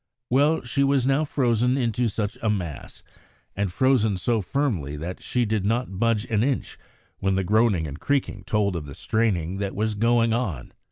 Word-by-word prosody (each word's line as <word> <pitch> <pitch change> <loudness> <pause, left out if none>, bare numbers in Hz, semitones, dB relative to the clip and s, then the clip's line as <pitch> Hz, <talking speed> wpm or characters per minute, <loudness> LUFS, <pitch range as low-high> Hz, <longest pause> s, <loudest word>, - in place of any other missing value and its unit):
Well, 145 +5 +3
she 135 +3 0
was 135 -2 +2
now 135 +3 +2
frozen 125 -2 +1
into 120 -1 0
such 105 0 -2
a 110 - +1
mass, 90 -8 -4 0.5
and 100 -2 -1
frozen 115 -3 +2
so 110 +5 0
firmly 95 - -1
that 85 +4 -6
she 125 -1 0
did 110 -2 0
not 110 -2 -1
budge 115 -1 +1
an 110 -4 0
inch 130 +2 -1 0.4
when 95 0 +1
the 95 - +1
groaning 105 -4 +2
and 75 0 -7
creaking 130 -8 -1
told 100 -3 +1
of 80 -3 -4
the 70 -1 -9
straining 95 -6 0
that 100 0 -3
was 110 +1 0
going 115 +1 +2
on. 100 - -3
110 Hz, 180 wpm, -24 LUFS, 95-125 Hz, 0.5 s, Well